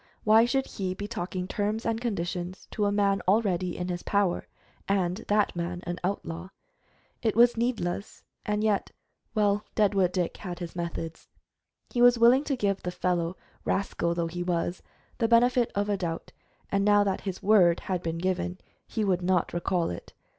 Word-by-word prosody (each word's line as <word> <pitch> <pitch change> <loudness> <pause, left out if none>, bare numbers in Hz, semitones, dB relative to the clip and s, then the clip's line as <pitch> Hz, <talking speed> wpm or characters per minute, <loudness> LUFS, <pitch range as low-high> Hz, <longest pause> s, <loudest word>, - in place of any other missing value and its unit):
Why 220 +2 +6
should 270 +2 +1
he 185 -2 -4
be 205 +2 -5
talking 185 -3 -4
terms 210 +3 -2
and 230 0 0
conditions 180 -5 -3
to 210 - 0
a 205 - +2
man 200 -1 +2
already 185 -4 +1
in 180 - -3
his 175 -1 -3
power, 200 -3 0 0.4
and 185 -2 +1
that 210 -2 +2
man 175 +1 -3
an 175 +1 -4
outlaw? 180 -2 -3 0.7
It 220 - +1
was 240 +1 +6
needless, 225 -5 -2 0.2
and 210 0 -1
yet 210 -2 +1 0.5
Well, 205 -1 +2
Deadwood 195 -4 +3
Dick 180 -2 -1
had 175 -3 -6
his 175 -1 -7
moods. 170 -1 -5 0.6
He 240 - 0
was 245 0 +7
willing 240 +4 +6
to 275 - 0
give 200 -3 0
the 180 - -3
fellow, 180 -1 -1 0.3
rascal 170 -3 0
though 170 -1 0
he 175 +2 -4
was, 175 0 -1 0.4
the 230 - +3
benefit 240 +1 +4
of 200 +1 0
a 205 -1 +1
doubt, 170 -3 -4 0.4
and 200 0 +2
now 205 0 +5
that 195 -2 -1
his 190 -2 -5
word 185 -5 +5
had 185 -2 -2
been 165 -1 -3
given 180 0 -1 0.3
he 220 - -2
would 185 -3 +1
not 180 -1 +1
recall 175 - 0
it. 85 - -8
190 Hz, 175 wpm, -28 LUFS, 175-210 Hz, 0.7 s, was